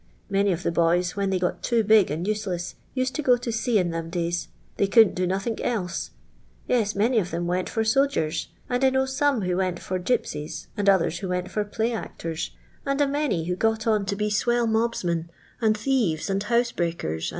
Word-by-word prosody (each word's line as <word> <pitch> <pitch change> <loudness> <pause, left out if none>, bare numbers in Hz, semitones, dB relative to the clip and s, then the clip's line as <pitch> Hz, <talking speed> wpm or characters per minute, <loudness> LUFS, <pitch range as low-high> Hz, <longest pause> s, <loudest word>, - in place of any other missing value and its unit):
Many 200 0 +3
of 175 0 -2
the - - +1
boys, 170 +2 +2
when 200 -1 0
they 190 - +1
got 180 0 -1
too 235 -2 +2
big 215 -2 +5
and 160 +6 -3
useless, 195 -5 -2 0.2
used 255 0 0
to 305 - -2
go 250 -4 +4
to 240 -1 -4
sea 225 0 +1
in 180 -3 +1
them, 165 0 -4
days 175 0 -2
— - - -33
they 200 - +2
couldn't 220 0 +6
do 180 0 -1
nothink 195 +5 -2
else. 185 -8 -2 0.6
Yes, 220 -4 +1
many 225 +4 +3
of 180 -4 -2
them 170 +1 -2
went 180 +1 -1
for 225 - 0
aodgers; 220 - +1 0.2
and 250 +1 -1
I 265 - +6
know 265 0 +1
some 265 -2 +1
who 180 -1 0
went 185 -2 -1
for 185 0 -3
Qipsitft, 160 -7 -2
and 205 -2 +2
others 170 -3 +2
who 190 - -4
went 180 0 -2
for 210 - 0
play 220 +3 -1
aotors, 165 -7 -4 0.3
and 275 0 -1
a 290 - +5
many 275 - 0
who 180 +1 -1
got 220 +3 0
on 215 -3 +1
to 200 - 0
be 210 +1 -1
iwellr 240 +3 +1
mobsmen, 205 -7 0 0.3
and 215 -1 +3
thieres, 210 - 0
and 195 +1 0
boosebreakert, 205 - 0
and. 80 - -5
200 Hz, 215 wpm, -25 LUFS, 175-235 Hz, 0.6 s, couldn't